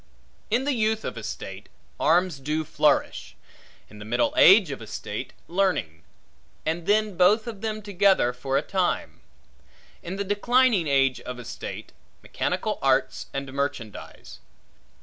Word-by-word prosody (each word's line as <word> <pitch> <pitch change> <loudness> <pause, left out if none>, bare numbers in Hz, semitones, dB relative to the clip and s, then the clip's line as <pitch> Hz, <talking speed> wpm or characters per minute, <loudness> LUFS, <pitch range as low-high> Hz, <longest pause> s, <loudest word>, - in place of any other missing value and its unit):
In 235 +4 +1
the 285 +1 0
youth 220 -2 0
of - - -4
a - - -6
state, - - -7 0.3
arms 170 -1 +2
do 150 +3 -2
flourish; - - 0 0.5
in 105 - -14
the - - -8
middle 120 +3 0
age 190 -3 +7
of 135 - -6
a 110 - -9
state, 105 +5 -6 0.2
learning; 175 - 0 0.6
and 165 +2 -2
then 210 -1 +2
both 205 +5 +4
of 220 -5 -7
them 215 -1 -3
together 195 -10 +3
for 135 +2 -2
a 145 - 0
time; 185 -2 -2 0.8
in 175 +2 -6
the 200 - -2
declining 205 -1 +2
age 135 -2 +2
of 125 0 -7
a 125 - -9
state, - - -7 0.3
mechanical - - -2
arts - - +1
and 135 -1 -5
merchandize. 135 -6 -5
175 Hz, 150 wpm, -25 LUFS, 135-205 Hz, 0.8 s, age